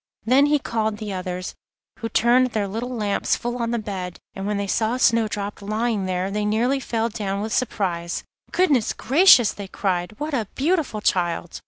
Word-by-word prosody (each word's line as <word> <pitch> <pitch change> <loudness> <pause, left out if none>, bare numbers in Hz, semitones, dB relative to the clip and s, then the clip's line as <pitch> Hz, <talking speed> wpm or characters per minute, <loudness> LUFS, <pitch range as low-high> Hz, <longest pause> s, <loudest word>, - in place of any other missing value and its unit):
Then 265 +5 +5
he 295 0 +3
called 220 -5 -2
the 210 -2 -5
others, 180 0 -4 0.5
who 225 - -3
turned 245 +3 +4
their 205 -2 0
little 225 +5 -4
lamps 210 -5 0
full 240 +1 -4
on 230 - -1
the 235 - 0
bed, 190 -5 -5 0.2
and 195 +1 -5
when 210 -1 -1
they 200 - -1
saw 220 +4 0
Snowdrop 215 -5 +1
lying 215 -1 -1
there 185 +1 -1
they 210 +1 -1
nearly 235 +6 +1
fell 230 -3 -1
down 200 -3 -3
with 220 +1 -3
surprise. 180 -8 -1 0.3
'Goodness 290 -11 +2
gracious!' 270 - +5
they 200 -1 -7
cried, 185 0 -2
'what 300 +1 -3
a 230 -6 0
beautiful 295 - 0
child! 175 -3 0
215 Hz, 180 wpm, -23 LUFS, 195-240 Hz, 0.5 s, Then